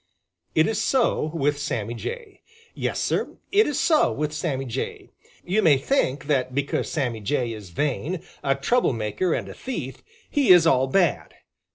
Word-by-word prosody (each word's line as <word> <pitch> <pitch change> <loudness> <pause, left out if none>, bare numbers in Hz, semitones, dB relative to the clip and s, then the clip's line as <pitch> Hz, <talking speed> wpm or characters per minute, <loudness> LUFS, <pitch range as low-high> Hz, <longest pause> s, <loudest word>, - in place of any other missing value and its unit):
It 155 - +5
is 220 -1 -1
so 250 - +2
with 145 -2 0
Sammy 115 -5 -3
Jay. 445 - -7 0.3
Yes, - - -2
Sir, - - -1
it 415 +2 +4
is 295 - -1
so 315 -3 +3
with 150 0 -2
Sammy 145 -4 -2
Jay. 120 - -5 0.3
You 195 +5 +2
may 150 -7 +5
think 140 - 0
that 130 -3 0
because 140 0 -1
Sammy 125 -8 -1
Jay 120 +2 -1
is 105 -4 -9
vain, 150 - -2 0.2
a 135 0 +2
trouble 190 - +1
maker 115 - -1
and - - -4
a - - -8
thief, 160 - -6 0.3
he 285 -3 +1
is 175 -3 +8
all 135 -5 +4
bad. 175 +6 +1
145 Hz, 170 wpm, -24 LUFS, 130-190 Hz, 0.3 s, is